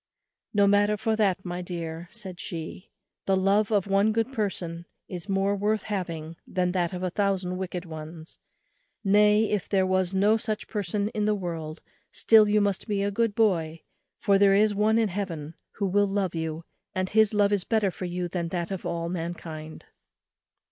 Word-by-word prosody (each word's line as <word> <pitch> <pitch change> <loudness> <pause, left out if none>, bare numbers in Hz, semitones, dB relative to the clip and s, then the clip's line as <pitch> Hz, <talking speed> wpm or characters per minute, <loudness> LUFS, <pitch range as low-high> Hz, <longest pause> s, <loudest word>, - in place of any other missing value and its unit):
"No 205 -1 +4
matter 205 +1 +3
for 220 +1 0
that, 195 -4 +1
my 175 0 -4
dear," 170 -1 -6
said 190 -6 -8
she; 165 +1 -7 0.4
"the 195 -1 +3
love 200 +3 +2
of 205 -3 +2
one 200 +2 +3
good 225 +4 -1
person 175 -6 -3 0.2
is 180 +2 -7
more 195 +1 +1
worth 210 +1 0
having 170 -5 -4
than 180 -1 0
that 175 -2 0
of 180 0 -5
a 185 - -1
thousand 190 -2 0
wicked 185 -1 -4
ones; 160 0 -9 0.6
nay, 210 +2 +4
if 210 -3 -1
there 190 -2 +3
was 185 -1 +1
no 205 +3 +3
such 215 -1 -3
person 205 0 -2
in 210 -1 -1
the 210 0 +2
world, 165 -4 -5 0.3
still 220 -2 +5
you 210 0 +4
must 200 0 -1
be 200 -2 0
a 200 - 0
good 225 0 0
boy; 165 -8 +1 0.3
for 200 -2 +3
there 195 -1 +6
is 210 +1 +4
one 215 +2 +2
in 225 -2 +2
Heaven 170 -5 -4 0.2
who 200 - -2
will 200 +2 +2
love 195 -2 -1
you, 160 0 -4 0.3
and 185 0 0
his 220 -1 +4
love 205 -1 +3
is 200 -3 +1
better 215 -3 +1
for 185 - -6
you 175 0 -3
than 170 -1 -3
that 170 +1 -3
of 185 -2 -4
all 170 -1 -2
mankind." 165 -2 -6
195 Hz, 185 wpm, -27 LUFS, 175-205 Hz, 0.6 s, there